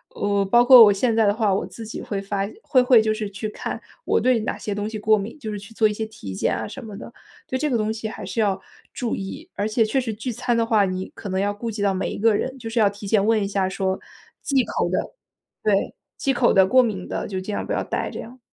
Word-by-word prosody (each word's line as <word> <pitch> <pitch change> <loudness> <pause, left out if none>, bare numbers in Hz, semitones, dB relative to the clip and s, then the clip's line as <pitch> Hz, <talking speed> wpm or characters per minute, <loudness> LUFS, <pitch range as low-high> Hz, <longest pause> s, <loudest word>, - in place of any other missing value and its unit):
呃， - - -10
我 200 -1 +2
包 240 +5 +5
括 255 -1 +10
我 205 - +5
现 230 +4 +1
在 225 -1 +4
的 205 - +3
话， 215 -2 +1
我 195 - 0
自 225 - -9
己 220 - -6
会 200 -2 -4
发 195 0 -2 0.2
会 255 - +4
会 250 -2 +6
就 215 0 +1
是 215 -1 -4
去 205 +2 -5
看 - - -5 0.3
我 - - +2
对 255 -2 +3
哪 215 - -3
些 210 - -4
东 205 +1 -3
西 220 - -5
过 215 +1 +4
敏， 210 +8 -6
就 220 -6 -5
是 205 - -4
去 200 +3 -13
做 220 -1 +3
一 - - -2
些 220 +1 -3
体 105 - -8
检 - - 0
啊 110 - -3
什 - - -9
么 210 -2 -8
的。 235 - -10 0.3
对 260 - -2
这 300 +2 0
个 255 - 0
东 215 0 0
西 220 0 -5
还 - - -7
是 - - -4
要 195 -3 +1 0.3
注 240 -3 -2
意， 195 - -7
而 205 - -1
且 225 +1 +2
确 265 +5 +1
实 230 -3 -3
聚 225 +4 -4
餐 240 +1 -1
的 230 - +2
话， 220 -3 +3
你 185 0 -4
可 210 - -8
能 190 0 -1
要 205 +1 0
顾 230 +3 -5
及 210 -1 -5
到 200 -1 +2
每 190 - -2
一 - - -5
个 225 +1 +4
人， 260 +5 -2
就 225 -2 -6
是 230 +1 -1
要 210 -2 +5
提 205 +1 -10
前 200 -1 +3
问 220 -1 +3
一 - - -1
下 195 -2 0
说 190 0 -1 0.4
忌 270 -4 +2
口 - - -1
的 - - 0 0.7
对， 205 -2 +1 0.2
忌 275 - +1
口 245 -1 +3
的、 190 - +7
过 255 +7 +5
敏 205 -6 -3
的 - - -3
就 190 -2 -3
尽 190 +3 -5
量 - - -3
不 - - -2
要 - - 0
带 - - -2
这 - - -6
样。 245 +3 -11
215 Hz, 310 characters per minute, -23 LUFS, 200-230 Hz, 0.7 s, 括